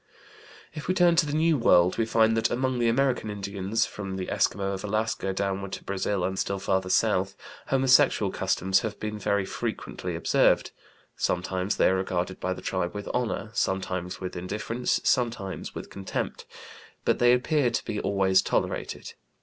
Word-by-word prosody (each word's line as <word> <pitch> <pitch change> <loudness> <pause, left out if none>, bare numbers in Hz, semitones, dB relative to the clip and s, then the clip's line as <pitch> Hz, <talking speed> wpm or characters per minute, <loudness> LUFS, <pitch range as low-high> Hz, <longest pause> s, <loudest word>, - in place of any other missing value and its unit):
If 150 -1 -7
we 185 - +1
turn 175 -2 +5
to 160 -3 +4
the 145 - -3
New 160 -2 +3
World, 90 -4 +4
we 115 - +1
find 110 0 +3
that 115 - +2
among 130 0 0
the 120 -1 +3
American 125 -2 +1
Indians, 100 +2 -1
from 100 -2 -6
the 95 -1 -4
Eskimo 100 0 0
of 95 0 -5
Alaska 110 -1 -1
downward 100 0 -2
to - - -6
Brazil 100 -1 -1
and 95 +1 -1
still 100 - -1
farther 95 -1 -1
south, - - +2 0.3
homosexual 130 -1 +4
customs 95 +1 +1
have 110 -2 -5
been 105 0 -4
very 100 -1 0
frequently - - -4
observed. - - +2 0.4
Sometimes 95 +2 -1
they - - +4
are 95 - +2
regarded 95 0 -2
by 95 - -2
the 95 - -5
tribe 95 0 -2
with 105 -1 -5
honor, 115 -3 -2
sometimes 95 -4 -2
with 90 - -5
indifference, 105 +7 -2
sometimes 115 -6 -1
with - - -7
contempt; 95 -1 -4 0.6
but - - +2
they 120 0 +5
appear 130 +2 +2
to 120 - -2
be 110 -2 -3
always 95 -1 +3
tolerated. - - -2
100 Hz, 170 wpm, -27 LUFS, 95-120 Hz, 0.6 s, turn